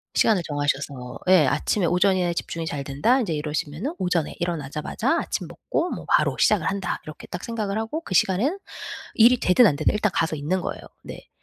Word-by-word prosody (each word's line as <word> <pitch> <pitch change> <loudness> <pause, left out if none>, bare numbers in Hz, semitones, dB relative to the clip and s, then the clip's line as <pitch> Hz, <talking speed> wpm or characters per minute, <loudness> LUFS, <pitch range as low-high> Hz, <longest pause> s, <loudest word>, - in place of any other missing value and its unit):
시간을 215 -5 +3
정하셔서 140 -3 -3
예 175 -7 +6
'아침에 170 +7 +1
오전이나 180 0 +2
집중이 165 -1 -4
잘 145 -3 -4
된다.' 185 - +2
이제 205 - -2
이러시면은 150 - -3
'오전에 180 -4 0
일어나자마자 155 -4 -1
아침 - - -4
먹고 345 - -2
뭐 - - -6
바로 - - +3
시작을 200 -6 +3
한다.' 195 -2 -2
이렇게 155 - -10
딱 175 - -6
생각을 215 -3 -3
하고 225 +9 -3
그 190 - -6
시간엔 225 - +2 0.6
일이 240 +2 +6
되든 185 +7 +5
안 155 - +2
되든 155 +2 +1
일단 210 -2 +1
가서 160 -1 0
있는 175 +6 -1
거예요. - - -5 0.2
네. - - -10
175 Hz, 415 characters per minute, -24 LUFS, 150-210 Hz, 0.6 s, 예